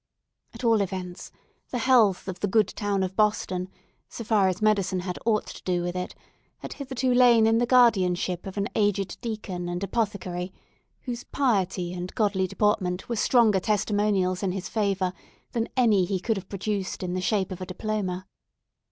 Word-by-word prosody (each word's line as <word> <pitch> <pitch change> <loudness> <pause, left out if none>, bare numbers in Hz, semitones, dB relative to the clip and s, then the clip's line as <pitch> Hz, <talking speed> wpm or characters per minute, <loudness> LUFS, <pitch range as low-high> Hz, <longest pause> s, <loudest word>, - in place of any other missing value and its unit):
At - - -9
all 225 -3 +4
events, 180 -2 -5 0.4
the 250 - -2
health 225 -7 +3
of 185 -1 -5
the 205 - 0
good 210 0 +3
town 200 -2 -1
of 190 0 -3
Boston, 190 -4 0 0.4
so 230 - -7
far 210 -3 +3
as 185 0 -1
medicine 200 -4 +1
had 180 -1 -5
aught 215 -2 +2
to - - -10
do 180 -1 0
with 175 0 -3
it, 180 0 -4 0.4
had - - -7
hitherto 260 -2 -1
lain 240 -3 +6
in 225 +1 +4
the 240 - +1
guardianship 190 -8 +3
of 195 - -8
an 200 0 0
aged 205 -2 0
deacon 205 -7 -4
and 175 +2 -3
apothecary, 195 -4 -2 0.5
whose 245 -2 -5
piety 195 -9 0
and 180 0 -6
godly 200 -4 +1
deportment 190 -2 0
were 235 - -1
stronger 220 -2 +4
testimonials 205 -2 +1
in 190 -3 -1
his 190 -1 -4
favour 195 -4 0 0.4
than 230 -1 -1
any 225 -6 +4
that 180 - -1
he 190 - +1
could 225 +4 0
have 195 - -7
produced 195 -1 -3
in 180 -1 -2
the 185 - -1
shape 190 0 0
of 185 - -6
a - - -3
diploma. 190 -1 -3
200 Hz, 180 wpm, -26 LUFS, 185-220 Hz, 0.5 s, lain